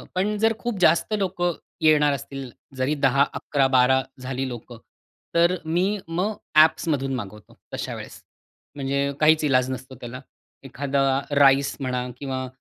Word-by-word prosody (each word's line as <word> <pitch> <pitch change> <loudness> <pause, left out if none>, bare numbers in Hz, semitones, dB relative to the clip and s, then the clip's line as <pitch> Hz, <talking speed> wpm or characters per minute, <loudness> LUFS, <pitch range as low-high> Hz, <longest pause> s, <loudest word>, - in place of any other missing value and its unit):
पण 205 +3 0
जर 225 +2 +3
खूप 240 -5 -3
जास्त 170 +4 +3
लोकं 175 -3 -1 0.3
येणार 150 -2 +4
असतील, 135 0 -6 0.3
जरी 130 +4 0
10-11-12 135 -1 +2 0.2
झाली 130 +1 -3
लोकं 120 -1 -8 0.6
तर 170 +2 +4
मी 185 +6 0
मग 180 +6 -1 0.3
ऍप्समधून 145 -4 0
मागवतो, 105 -3 -9 0.2
तशा - - -4
वेळेस. - - -10 0.5
म्हणजे 140 0 -1
काहीच 155 +1 +4
ईलाज 130 -3 +2
नसतो 130 +1 -7
त्याला. 125 +2 -7 0.4
एखादा 135 0 0 0.2
राईस 140 0 +4
म्हणा 125 -2 -2
किंवा 130 -1 -4
140 Hz, 130 wpm, -24 LUFS, 130-160 Hz, 0.6 s, येणार